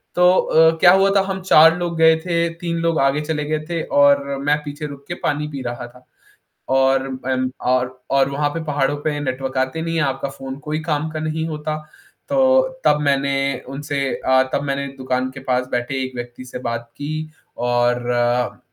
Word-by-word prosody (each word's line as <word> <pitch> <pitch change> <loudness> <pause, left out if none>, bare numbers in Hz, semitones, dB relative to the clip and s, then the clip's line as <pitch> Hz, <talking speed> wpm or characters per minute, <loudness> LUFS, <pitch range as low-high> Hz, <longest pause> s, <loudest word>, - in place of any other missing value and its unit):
तो 180 0 +6
अ, 160 0 +4
क्या 175 - +7
हुआ 195 +1 +4
था 195 - +5
हम 190 -1 -3
4 165 -2 +6
लोग 170 -1 -3
गए 160 0 +6
थे, 170 0 0
तीन 170 0 -4
लोग 165 -1 +1
आगे 135 +2 +2
चले 150 -1 -2
गए 155 0 -1
थे 165 -1 -1 0.2
और 140 0 +5 0.2
मैं 145 +1 +3
पीछे 145 +1 -6
रुक 140 -1 -11
के 175 - -3
पानी 150 +1 0
पी 140 -3 -6
रहा 120 0 -5
था। 125 +1 -19 0.7
और 135 0 +3 0.2
अम, 130 -1 0
और 130 0 0
और 135 0 +3
वहाँ 145 +1 0
पे 165 +1 -4
पहाड़ों 145 -1 0
पे 150 -1 -1
नेटवर्क 130 -1 -3
आते 130 +5 -1
नहीं 165 0 -3
हैं, 165 - +2
आपका 135 0 -2
फ़ोन 135 0 -8
कोई 155 +1 -1
काम 155 -1 -1
का 155 0 -5
नहीं 160 +1 -2
होता। 155 0 -3 0.5
तो 265 -1 +4 0.2
तब 150 0 +4
मैंने 140 -1 +1 0.3
उनसे 145 +1 -4 0.2
अ, 130 0 +3
तब - - +1
मैंने 140 0 -2
दुकान 130 0 -1
के 135 - -9
पास 125 0 +1
बैठे 125 +2 -1
एक 130 0 -7
व्यक्ति 120 +1 -7
से 125 - -7
बात 115 0 -5
की 145 +2 -4 0.4
और 120 0 +1
अ, 120 0 0
145 Hz, 200 wpm, -20 LUFS, 130-160 Hz, 0.7 s, क्या